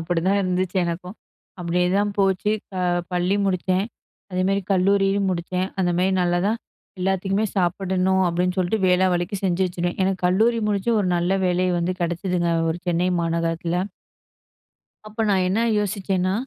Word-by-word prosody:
அப்படிதான் 175 +4 +1
இருந்துச்சு 185 0 -1
எனக்கும். 180 +4 -5 0.4
அப்படியேதான் 180 +4 +1
போச்சு. 195 +1 +2 0.2
க 190 - -12 0.4
பள்ளி 180 +3 +1
முடிச்சேன். 185 +1 0 0.5
அதேமாரி 190 +2 +1
கல்லூரியும் 195 +1 +2
முடிச்சேன். 180 +2 -2
அந்த 175 -1 +2
மாரி 185 +1 +2
நல்லாதான். 180 +6 +1 0.4
எல்லாத்துக்குமே 195 +2 0
சாப்பிடணும் 190 +1 +1
அப்படின்னு 180 +2 0
சொல்ட்டு, 185 +4 +1
வேளா 185 +1 +4
வேளைக்கு 175 +3 -2
செஞ்சு 185 0 +1
வச்சுருவேன். 175 0 -3
எனக்கு 190 -1 -1
கல்லூரி 225 +6 +3
முடிச்சு 205 +2 0
ஒரு 185 - 0
நல்ல 180 +3 +1
வேலை 180 0 +1
வந்து 175 +2 -1
கெடச்சுதுங்க. 175 0 -1 0.2
ஒரு 165 - -3
சென்னை 175 +1 +1
மாநகரத்துல. 165 +1 -1 1.3
அப்ப 215 +2 -7
நான் 190 -2 +2
என்ன 200 +5 +1 0.2
யோசிச்சேன்னா. 190 -2 -1
185 Hz, 135 wpm, -23 LUFS, 175-195 Hz, 1.3 s, வேளா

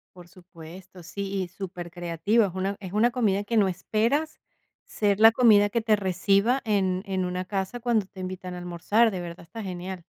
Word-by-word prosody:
Por 175 -1 -13
supuesto, 180 0 -13
sí, 195 +3 -4
y 185 - -3
supercreativo. 175 +3 -1
Es 185 - -5
una 195 +1 -2
es 190 -1 -8
una 225 +3 +3
comida 205 -5 0
que 230 +2 -1
no 200 -2 +4
esperas 230 - -1 0.5
ser 205 -1 0
la 225 +1 +8
comida 215 -4 +5
que 230 +2 -1
te 220 -1 +3
reciba 200 +6 +1
en 190 -3 +1
en 190 -1 -1
una 180 +1 -3
casa 195 +4 -3
cuando 230 -4 +1
te 190 - -15
invitan 185 0 -6
a 180 - -6
almorzar, 180 +6 +1
de 190 - -5
verdad 170 0 -8
está 220 +6 -8
genial. 180 -1 -6
190 Hz, 190 wpm, -26 LUFS, 180-215 Hz, 0.5 s, la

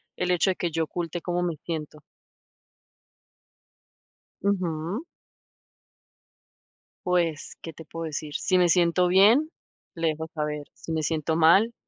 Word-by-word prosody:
el 180 0 -1
hecho 180 +2 +3
de - - -3
que 175 -2 -2
yo 165 +1 0
oculte 170 +1 -4
cómo 175 0 -1
me 170 -2 -1
siento. 155 -2 -5 2.4
Ujú. 185 - -1 2.0
Pues, 170 -4 0
¿qué 165 - -8
te 160 - -11
puedo 165 +1 -6
decir? 150 -1 -5
Si 185 - +2
me 180 -1 +4
siento 175 +1 +3
bien, 225 - +5 0.4
le 165 -1 -1
dejo 160 +1 -2
saber. 150 -1 -3
Si 165 - -7
me 155 -1 -1
siento 160 +1 0
mal, 190 +8 +5
170 Hz, 130 wpm, -26 LUFS, 160-180 Hz, 2.4 s, bien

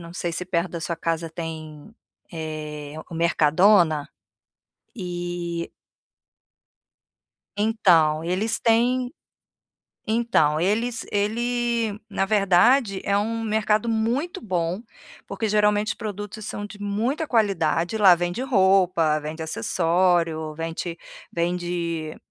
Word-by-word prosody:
eu - - -10
não 170 0 -10
sei 175 -2 -3
se 180 - -3
perto 180 0 -1
da 170 - -4
sua 170 0 -3
casa 165 0 -2
tem, 160 +2 -8 0.4
eh, 155 -2 -6 0.2
o - - -7
Mercadona, 165 0 +3 0.9
e 175 -3 -4 1.9
então, 175 -8 +3
eles 200 +6 0
têm 245 +3 +2 1.0
então 220 -10 +2
eles 225 +6 0
ele, 230 +1 -1
na 195 - 0
verdade, 200 +2 +3
é 200 0 +2
um 225 +2 -2
mercado 215 0 +1
muito 230 +9 -1
bom, 180 -2 -2 0.5
porque, 220 - -3
geralmente, 210 0 +2
os - - 0
produtos 210 0 -6
são 205 - -5
de 205 0 -10
muita 230 +10 -1
qualidade, 195 - +1
lá 190 -4 +8
vende 175 +6 -3
roupa, 190 - +3
vende 155 +2 -6
acessório, 165 -1 +1
vende 165 +1 -4 0.4
vende 170 -2 -2
185 Hz, 110 wpm, -24 LUFS, 165-220 Hz, 1.9 s, lá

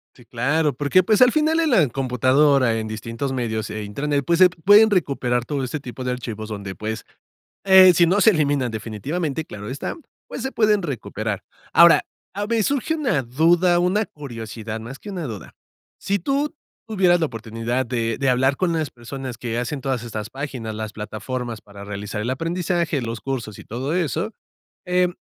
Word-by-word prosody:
Sí, 120 - -18
claro, 140 +6 0
porque, 145 +7 +3
pues, 215 +4 +2
al 250 -1 +7
final 315 +3 +2
en 320 - +2
la 190 - +4
computadora, 130 0 +2
en 110 -1 -4
distintos 115 +5 -4
medios 110 -4 -2
e 105 0 -5
Internet, 140 +7 -2
pues, 170 0 +2
se 185 -1 +8
pueden 205 +6 +6
recuperar 130 - 0
todo 140 -1 -2
este 130 +4 -3
tipo 130 -1 -8
de 125 - -1
archivos 115 -3 -5
donde, 100 -3 -6
pues, 110 0 -5 0.6
eh, 190 -1 +8
si 170 +1 +5
no 190 +5 +2
se 220 - +7
eliminan 145 - +1
definitivamente, 135 - -3
claro 105 -6 -8
está, 135 +3 -4 0.3
pues, - - -6
se 265 - -3
pueden 210 -2 +3
recuperar. 110 - -4 0.3
Ahora, - - +7 0.3
a 205 +2 -3
ver, 225 0 +1
surge 280 +7 0
una 270 - 0
duda, 170 +8 +3
una 195 +4 +1
curiosidad, 115 -5 -7
más 125 +5 -9
que 210 - -8
una 180 -4 -4
duda. 110 -7 -8 0.4
Si 200 0 -1
tú 280 - -1 0.3
tuvieras 185 -5 +3
la 160 - +2
oportunidad 115 +1 -3
de 115 -2 -1
de 135 - 0
hablar 130 +2 +2
con 180 +1 0
las 160 -3 -1
personas 125 +1 -7
que 115 0 -4
hacen 125 +4 -3
todas 130 -3 -2
estas 110 -2 -5
páginas, 130 -5 -5
las 110 -1 -5
plataformas 110 +2 -5
para 100 -1 -13
realizar 105 +1 -5
el 115 +4 -2
aprendizaje, 165 0 -1
los 115 -1 -4
cursos, 120 -6 -4
y - - -11
todo 130 +7 -3
eso, 180 +4 -1 0.5
em, 180 0 +2
135 Hz, 185 wpm, -22 LUFS, 115-175 Hz, 0.6 s, se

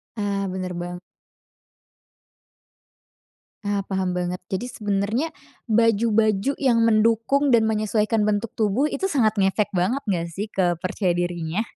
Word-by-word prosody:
Ah, 200 -2 -1
bener 185 -1 -4
bang 175 0 -5 2.7
Ah, 200 -1 -1
paham 190 -2 -1
banget. 180 0 -3
Jadi, 195 +5 -2
sebenernya 210 +5 -1 0.4
baju-baju 225 +1 +2
yang 245 -5 +2
mendukung 230 +5 +3
dan 220 -1 +4
menyesuaikan 215 0 +1
bentuk 210 +1 0
tubuh, 220 +7 +1
itu 385 - -2
sangat 235 - +1
ngefek 195 +2 +2
banget 200 +8 0
nggak 170 -4 0
sih 205 +5 -4
ke 180 -4 +1
percaya 185 0 0
dirinya? 175 +1 -2
210 Hz, 125 wpm, -23 LUFS, 190-230 Hz, 2.7 s, dan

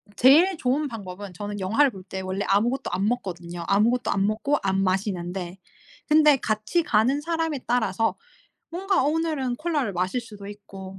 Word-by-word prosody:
제일 320 - +5
좋은 280 +3 0
방법은 200 -4 -8
저는 205 +2 -6
영화를 225 +10 +3
볼 190 -4 -10
때 190 0 -6
원래 190 +2 -3
아무것도 230 +7 +1
안 190 +3 0
먹거든요. 175 -7 -4
아무것도 225 +4 +2
안 195 0 +1
먹고 225 +8 0
안 195 0 +1
마시는데 185 -1 -2 0.5
근데 300 -2 +6
같이 215 +10 0
가는 245 +5 +2
사람에 325 -2 -2
따라서 225 -2 +1 0.6
뭔가 380 -1 +1
오늘은 295 -4 0
콜라를 295 - -1
마실 185 +7 -1
수도 210 -3 -11
있고 195 -2 -10
215 Hz, 345 characters per minute, -25 LUFS, 195-280 Hz, 0.6 s, 근데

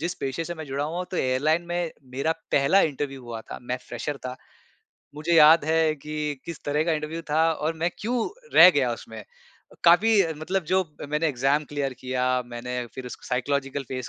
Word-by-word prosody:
जिस 175 +3 -2
पेशे 135 +5 -2
से 175 - -5
मैं 160 -2 -7
जुड़ा 140 +1 -2
हुआ 160 +3 -4
हूँ 180 - -2
तो 185 - -4
एयरलाइन 145 +6 +1
में, 175 -1 -2 0.2
मेरा 140 +5 0 0.2
पहला 140 +8 +4
इंटरव्यू 135 -4 -2
हुआ 115 -1 -6
था, - - -9
मैं 125 +1 -2
फ्रेशर 145 -1 -4
था। 125 - -5 0.8
मुझे 155 +3 -2
याद 160 0 +7
है 160 0 +2
कि 150 0 -4
किस 170 -3 -8
तरह 150 +2 +1
का 165 - +1
इंटरव्यू 155 +2 -3
था 160 +2 +3
और 155 +1 -2
मैं 170 +2 0
क्यों 235 +1 -1 0.3
रह - - +10
गया - - +1
उसमें। - - -9 0.6
काफ़ी 205 +6 +6 0.2
मतलब 185 +3 -1
जो 185 +4 +2 0.2
मैंने 150 +2 0
एग्ज़ाम 140 +2 +1
क्लियर 140 -2 -1
किया, 130 0 0
मैंने 125 +1 -5
फिर 130 -1 -7
उसको 125 - -9
साइकोलॉजिकल 135 +2 -1
फेस 130 -3 -5
150 Hz, 190 wpm, -25 LUFS, 135-165 Hz, 0.8 s, रह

